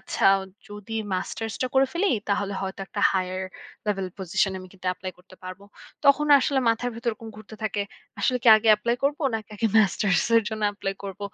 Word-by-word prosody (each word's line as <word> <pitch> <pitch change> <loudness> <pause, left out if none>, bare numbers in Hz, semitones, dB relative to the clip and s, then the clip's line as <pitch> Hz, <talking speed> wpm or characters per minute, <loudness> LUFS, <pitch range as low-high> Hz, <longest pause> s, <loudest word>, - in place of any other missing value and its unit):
আচ্ছা - - 0 0.4
যদি 210 +2 -7 0.2
মাস্টার্স 225 +4 -4
টা - - +1
করে 270 0 +5
ফেলি 370 +4 +1 0.2
তাহলে 200 0 0
হয়তো 190 0 -5
একটা 205 - -5
হায়ার 185 0 -2 0.4
লেভেল 195 -2 -1
পজিশন 190 +1 0
এ - - -4
আমি 185 - -11
কিন্তু 185 -1 -11
এপ্লাই 185 +1 -7
করতে 180 +1 -18
পারব। 185 +1 -8 0.4
তখন 280 +2 +5
আসলে 275 +1 +1
মাথার 230 +2 0
ভিতর 235 +1 -2
এরকম 225 +1 -10
ঘুরতে 215 0 -11
থাকে। 210 -1 -1 0.4
আসলে 250 -1 +1
কি - - +4
আগে 215 +1 0
এপ্লাই 235 +3 -1
করব 285 +1 +1 0.2
নাকি 220 -1 -5
আগে 225 - +1
মাস্টার্স 195 -3 +2
এর 230 - +5
জন্য 220 -1 -5
এপ্লাই 195 -1 -3
করব। 195 0 -7
210 Hz, 195 wpm, -25 LUFS, 190-230 Hz, 0.4 s, করে